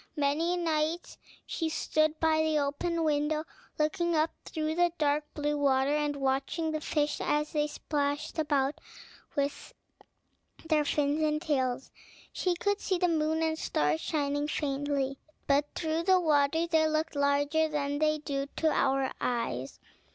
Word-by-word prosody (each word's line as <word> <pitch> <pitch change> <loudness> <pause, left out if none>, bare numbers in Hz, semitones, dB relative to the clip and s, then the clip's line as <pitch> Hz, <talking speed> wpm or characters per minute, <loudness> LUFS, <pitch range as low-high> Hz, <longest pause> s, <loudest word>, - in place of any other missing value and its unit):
Many 305 +5 +1
nights 325 0 -1 0.3
she 325 -2 -2
stood 310 0 +1
by 315 -1 +3
the 315 -1 +2
open 325 +4 -1
window, 305 0 +1 0.3
looking 340 +2 +1
up 310 +1 +2
through 310 -1 -2
the 350 +1 +3
dark 295 0 +1
blue 295 0 0
water, 275 0 +3
and 295 -1 0
watching 275 +4 -1
the 310 -1 -2
fish 295 -1 0
as 300 0 0
they 300 -1 +1
splashed 290 0 -2
about 285 -2 0 0.5
with 285 -1 -2 0.9
their 305 -2 +3
fins 290 +1 +1
and 305 -1 +1
tails. 265 -5 -1 0.4
She 360 -1 0
could 405 +3 0
see 375 - 0
the 360 0 +2
moon 320 0 +1
and 320 0 0
stars 150 +2 0
shining 290 -1 -1
faintly; 280 -2 -1 0.3
but 280 +1 +3
through 320 0 -1
the 370 +1 +4
water 310 0 +2
they 320 -2 +3
looked 310 0 -1
larger 285 +2 +2
than 290 -1 -2
they 310 0 +2
do 280 -2 -3
to 320 -1 +2
our 270 -2 +1
eyes. 185 - -2
300 Hz, 150 wpm, -30 LUFS, 285-315 Hz, 0.9 s, the